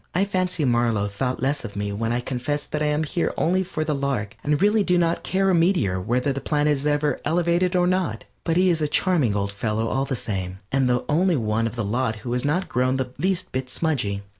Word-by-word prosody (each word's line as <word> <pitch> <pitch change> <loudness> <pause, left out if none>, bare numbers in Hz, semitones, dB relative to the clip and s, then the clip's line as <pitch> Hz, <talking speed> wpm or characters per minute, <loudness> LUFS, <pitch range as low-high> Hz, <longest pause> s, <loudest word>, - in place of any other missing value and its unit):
I 190 +3 +3
fancy 185 -5 -1
Marlow 120 -4 +2
thought 125 +6 -3
less 140 +2 0
of 100 - -7
me 100 0 -2
when 115 +3 -2
I 120 +1 0
confessed 135 +4 -3
that 150 - -2
I 150 - +2
am 150 +1 +1
here 165 +3 -1
only 185 +3 +2
for 165 -4 -3
the 155 -1 -1
lark, 135 -7 -2
and 150 0 +1
really 210 +2 +3
do 180 -2 +2
not 170 -1 +1
care 195 0 +1
a - - +2
meteor 165 - +2
whether 125 +7 0
the 135 - -4
planet 150 +2 +1
is 145 +1 -2
ever 145 -2 +1
elevated 175 +2 +1
or 180 -1 +3
not. 185 0 0 0.2
But 165 0 0
he 185 0 +4
is 165 -2 0
a 150 - +2
charming 145 - +2
old 100 0 -1
fellow 110 +2 -1
all 135 +1 0
the 135 - -2
same, 95 -5 -4
and 135 -2 +2
the 125 0 +1
only 175 +4 +2
one 115 -2 0
of 115 - -6
the 115 -3 -2
lot 115 +2 0
who 120 - -2
has 125 - 0
not 160 +7 0
grown 130 +2 +1
the 130 -1 -3
least 185 +2 0
bit 130 0 -3
smudgy. 120 -11 -1
140 Hz, 240 wpm, -24 LUFS, 120-170 Hz, 0.2 s, he